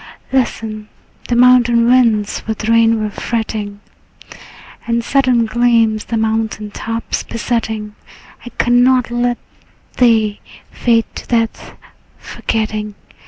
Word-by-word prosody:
Listen: 220 -4 -2 0.4
the 240 - 0
mountain 240 -1 +5
winds 230 -4 +2
with 220 0 -3
rain 230 0 +4
were 210 - -3
fretting, 210 -3 -4 1.1
And 235 0 0
sudden 255 -3 +2
gleams 225 -1 +2
the 230 - -2
mountain 220 -1 -2
tops 225 +2 -4
besetting. 220 -2 -3 0.5
I 245 - -8
cannot 245 0 +3
let 240 0 0 0.6
thee 220 -4 +3 0.3
fade 230 -2 +1
to - - -9
death, 230 -2 -2 0.4
forgetting. 215 -2 -3
230 Hz, 105 wpm, -16 LUFS, 220-240 Hz, 1.1 s, mountain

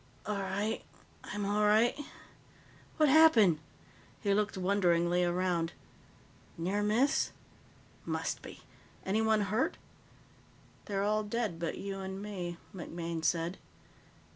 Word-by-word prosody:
"All 210 -1 -2
right. 200 +3 -2 0.4
I'm 205 -1 -3
all 205 +1 +1
right. 220 +3 +4 1.0
What 305 -2 +5
happened?" 255 - +6 0.6
He 200 -3 +1
looked 210 0 0
wonderingly 180 -2 +2
around. 175 -1 0 0.8
"Near 185 +5 -1
miss? 225 +7 +2 0.7
Must - - -2
be. - - -11 0.4
Anyone 220 +2 +2
hurt?" 210 +5 0 1.1
"They're 195 -1 -1
all 215 +1 +2
dead 210 -5 -2
but 165 -1 -3
you 195 0 -5
and 190 0 -5
me," 185 -4 -5 0.2
MacMaine 170 -2 -5
said. 170 +3 0
200 Hz, 110 wpm, -32 LUFS, 175-210 Hz, 1.1 s, happened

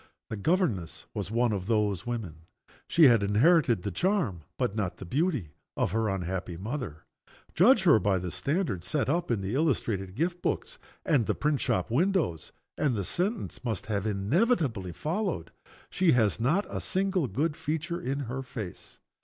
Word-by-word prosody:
The - - -1
governess 115 - 0
was - - -4
one 115 +1 +2
of 95 -2 -3
those 105 -2 0
women. 90 -10 -5 0.4
She 170 - +4
had 120 -7 +7
inherited 115 - +3
the 100 - -2
charm, 175 - 0 0.2
but 100 - -1
not 100 -5 -2
the - - -8
beauty, 135 - 0 0.3
of - - +1
her 110 +1 +1
unhappy 95 -2 -3
mother. 105 - -5 0.5
Judge 210 +4 +5
her 160 -12 +6
by 100 -2 +2
the 90 -1 -4
standard 140 - -1
set 110 +6 0
up 170 +4 0
in 115 -5 0
the 95 +3 -3
illustrated 115 - 0
gift 175 +5 -1
books - - -2 0.3
and 120 -7 +2
the - - +1
print 150 -1 0
shop 95 +3 0
windows 160 - +1 0.3
and 145 -5 +2
the 100 - -1
sentence 190 - -2
must 115 -3 -3
have 105 -1 -1
inevitably 115 - +1
followed. 165 - -2 0.4
"She 180 -5 +3
has 110 -4 +2
not 155 - +2
a - - -4
single 190 -5 0
good 150 +9 -1
feature 165 +4 -3
in 140 -3 -2
her 130 +1 -4
face." 110 -8 -8
120 Hz, 170 wpm, -28 LUFS, 100-165 Hz, 0.5 s, had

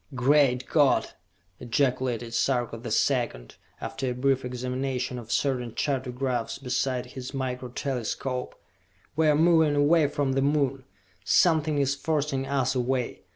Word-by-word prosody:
"Great 130 -1 +3
God!" 145 -4 +3 0.5
ejaculated 125 -1 -1
Sarka 120 -2 0
the 120 +1 -7
Second, 115 - 0 0.2
after 130 -1 -3
a 125 - -3
brief 135 +1 +1
examination 125 0 -3
of 115 -1 -10
certain 125 -5 -1
chartographs 130 -3 -2
beside 130 -1 -1
his 130 +2 -8
Micro 125 -1 -3
Telescope. 125 0 -3 0.6
"We 160 +1 +3
are 150 - +5
moving 160 -1 +4
away 150 +2 +4
from 140 -1 -1
the 135 - +1
Moon! 135 -2 0 0.4
Something 155 - +3
is 140 -1 +2
forcing 140 -2 -1
us 130 -2 0
away! 125 -1 -2
130 Hz, 130 wpm, -26 LUFS, 125-140 Hz, 0.6 s, are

